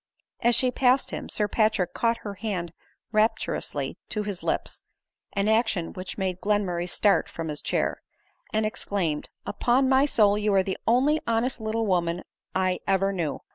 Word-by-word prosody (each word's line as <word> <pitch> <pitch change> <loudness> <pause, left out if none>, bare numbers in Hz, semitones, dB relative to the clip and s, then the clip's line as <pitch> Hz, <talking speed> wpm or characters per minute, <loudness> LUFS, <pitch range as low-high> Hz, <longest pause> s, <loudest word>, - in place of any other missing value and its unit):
As 240 0 +3
she 255 -1 +2
passed 255 +1 +2
him, - - -5
Sir 210 - 0
Patrick 215 -4 +1
caught 230 0 +1
her 205 - -3
hand 190 -5 -4 0.4
rap 215 +1 +3
turously - - -3
to 210 - -1
his 200 -3 -4
lips, - - -2 0.5
(an 200 +1 0
action 220 -6 +1
which 185 0 -6
made 185 -2 -2
Glenmurray 185 -4 0
start 200 +2 +2
from 165 -1 -5
his 150 0 -4
chair,) - - -1 0.5
and 215 0 +1
exclaimed, 195 -8 -2
" - - -49
upon 250 +5 +2
my 265 +1 +5
soul, 210 -6 +4
you 210 -1 +1
are 190 - +5
the 190 0 -3
only 275 +7 +3
honest 230 +1 0
little 220 +1 -1
woman 175 -3 0 0.3
I 185 -1 +1
ever 195 +1 +2
knew 160 -7 -2
205 Hz, 175 wpm, -26 LUFS, 185-230 Hz, 0.5 s, my